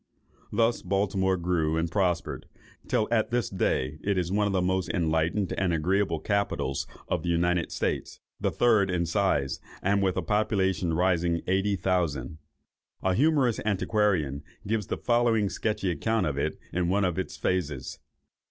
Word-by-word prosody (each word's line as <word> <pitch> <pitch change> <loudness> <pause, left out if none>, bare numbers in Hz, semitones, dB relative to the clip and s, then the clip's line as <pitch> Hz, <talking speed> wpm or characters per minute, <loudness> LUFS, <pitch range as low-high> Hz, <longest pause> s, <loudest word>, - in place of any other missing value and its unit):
Thus 115 -1 +2
Baltimore 95 -1 +1
grew 85 -3 0
and 80 0 -1
prospered, 90 -4 -1 0.4
till 110 - +1
at 115 0 +2
this 120 -3 -1
day 75 -6 -1
it 100 -1 0
is 90 -1 -1
one 105 +1 +2
of - - 0
the 95 - +1
most 95 0 0
enlightened 85 +3 0
and 95 -2 +1
agreeable 85 +1 +1
capitals 100 -7 -1 0.2
of - - -1
the 85 - -3
United 85 0 +1
States, - - -2 0.2
the - - +1
third 110 -5 +3
in 90 -1 0
size, 85 -7 0 0.2
and 100 +1 +1
with 95 -1 +1
a 95 - 0
population 95 -3 +1
rising 85 -1 +1
eighty 95 +2 +1
thousand. 85 -6 -1 0.6
A 95 - +2
humorous 135 - +3
antiquarian 95 -8 +1 0.2
gives 105 -1 -1
the - - -2
following 120 -4 +2
sketchy 105 -3 -1
account 110 +6 0
of 75 -3 -1
it 75 +2 -1 0.2
in 90 -1 0
one 100 +1 +2
of 90 -1 -1
its 95 - -4
phases. 75 -8 -2
95 Hz, 160 wpm, -27 LUFS, 85-105 Hz, 0.6 s, third